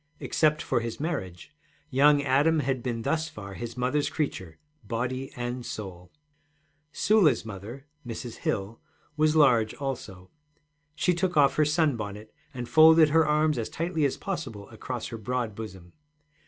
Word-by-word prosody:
Except 155 -1 +1
for - - 0
his 115 -1 -5
marriage, 140 - -5 0.4
young 145 +2 +5
Adam 145 +4 +3
had 130 -2 -1
been 115 -2 -3
thus 160 +3 -1
far 100 -2 -9
his 120 +4 -7
mother's 130 +4 0
creature, 95 - -4 0.3
body 125 +5 -3
and 120 0 -4
soul. 90 -6 -8 0.8
Sula's 180 - +3
mother, 110 +6 -8 0.2
Mrs. 120 0 -7
Hill, 100 +3 -3 0.3
was 155 0 +2
large 120 -8 +4
also. 110 -10 -6 0.6
She 180 - +2
took 175 0 -1
off 140 -2 +5
her 155 - +4
sunbonnet, 115 - -1 0.2
and 125 -3 -6
folded 155 +4 +7
her 160 +1 +4
arms 150 -2 +2
as 115 - -3
tightly 165 -1 -2
as 140 - +1
possible 135 - -5
across 120 +1 -6
her 115 - -6
broad 120 0 -2
bosom. 95 -5 -9
130 Hz, 145 wpm, -27 LUFS, 110-150 Hz, 0.8 s, folded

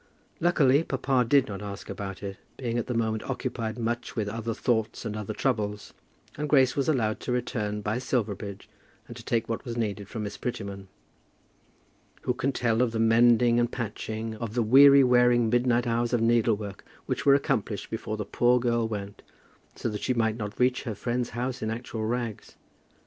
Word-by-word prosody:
Luckily 150 -5 +4
papa 135 -3 +1
did 135 -1 +5
not 100 -1 -6
ask 100 -1 -7
about 95 -1 -6
it, 100 -1 -5 0.2
being 120 -2 -2
at - - -4
the 125 - -2
moment 110 -1 0
occupied 115 -3 -3
much 120 +1 -3
with 110 -3 -1
other 115 +1 -3
thoughts 115 -1 -1
and 105 -2 -3
other 105 -2 -5
troubles, 105 -6 -2 0.5
and 150 0 -2
Grace 130 -3 +4
was 140 +1 0
allowed 110 -8 +1
to - - -4
return 105 -4 -2
by 105 +4 -1
Silverbridge, 105 -5 -3 0.4
and - - -9
to - - -10
take 115 -1 0
what 115 - -3
was 120 -3 -5
needed 105 -3 -3
from 110 - -4
Miss 105 - -5
Prettyman. 100 -5 -5 1.4
Who 125 - +1
can 130 +2 -1
tell 115 -3 +1
of 120 -2 +1
the 110 - -1
mending 120 +1 +5
and 120 -1 +1
patching, 110 -1 -4
of 115 0 -5
the 120 - +2
weary 140 +4 +8
wearing 125 -2 +4
midnight 120 0 +2
hours 120 +1 0
of 120 - +3
needlework 110 -3 +1 0.2
which 130 -1 -2
were 140 -1 +6
accomplished 110 -6 -1
before 110 -1 -4
the 105 - -3
poor 120 +4 +3
girl 120 -1 +1
went, 100 -2 -6 0.5
so - - -3
that 105 -2 -4
she 130 - 0
might 110 -2 +1
not 105 -2 -6
reach 125 0 +2
her 110 -4 -4
friend's 120 +3 -2
house 125 +1 -3
in 110 - -2
actual 115 -1 -4
rags? 115 -2 -4
115 Hz, 185 wpm, -27 LUFS, 110-125 Hz, 1.4 s, weary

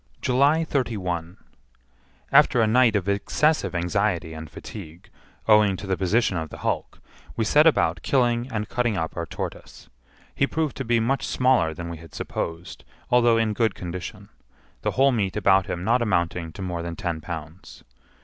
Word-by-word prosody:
July 140 +6 +3
31. 95 - -2 0.9
After 140 -3 +5
a 115 - +4
night 115 0 +4
of 100 -2 0
excessive 100 - +1
anxiety 90 -1 0
and 80 -1 -8
fatigue, 90 -4 -10 0.4
owing 105 -3 +5
to 100 - -7
the 95 -1 0
position 100 +1 +1
of 80 -1 -4
the - - -9
hulk, - - -2 0.4
we 115 - 0
set 150 +8 +5
about 80 - +2
killing 120 -1 +1
and 105 -2 -3
cutting 120 -4 0
up 80 -2 -3
our 85 -1 -4
tortoise. - - -7 0.4
He 140 - +1
proved 155 -2 -2
to 135 - -3
be 120 -1 +2
much 130 +5 0
smaller 125 -12 +2
than 85 +2 -6
we 85 -1 -6
had 80 -1 -14
supposed, 85 +2 -5 0.3
although 120 -2 +5
in 110 -1 +1
good 110 -2 +1
condition,—the 90 -1 -8
whole 135 +1 +3
meat 105 -5 -1
about 95 -2 +3
him 90 -2 -4
not 120 +5 +2
amounting 85 -6 0
to 95 - -7
more 90 -2 -3
than 85 0 -5
ten 85 -2 -3
pounds. 80 +1 -9
100 Hz, 170 wpm, -24 LUFS, 85-120 Hz, 0.9 s, After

